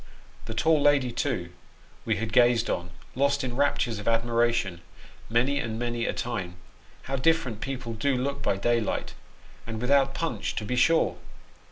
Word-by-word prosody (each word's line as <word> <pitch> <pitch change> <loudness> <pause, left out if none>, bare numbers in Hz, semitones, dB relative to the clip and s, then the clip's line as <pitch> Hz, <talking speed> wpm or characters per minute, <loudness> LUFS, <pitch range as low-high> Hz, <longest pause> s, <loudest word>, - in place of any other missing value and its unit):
The - - -6
tall 160 -2 +3
lady, 140 -4 +3
too, 115 -8 -2 0.5
we - - +1
had 110 +2 -4
gazed 120 -1 +4
on, 85 0 -3 0.2
lost 140 +1 +1
in 125 -2 -3
raptures 125 -5 +1
of 105 - -8
admiration, 115 -5 +1 0.5
many 125 +5 +2
and 110 -3 -3
many 120 -1 -2
a - - +1
time 95 -8 -4 0.5
how 135 +1 -3
different 130 -6 +1
people 130 -4 -4
do 135 +5 0
look 140 +2 -2
by 100 - 0
daylight, 115 +1 0 0.5
and 110 -1 -4
without 135 +2 +2
punch, 130 -11 -2
to 105 - -3
be 125 - -2
sure 165 +6 +3
120 Hz, 160 wpm, -27 LUFS, 115-140 Hz, 0.5 s, gazed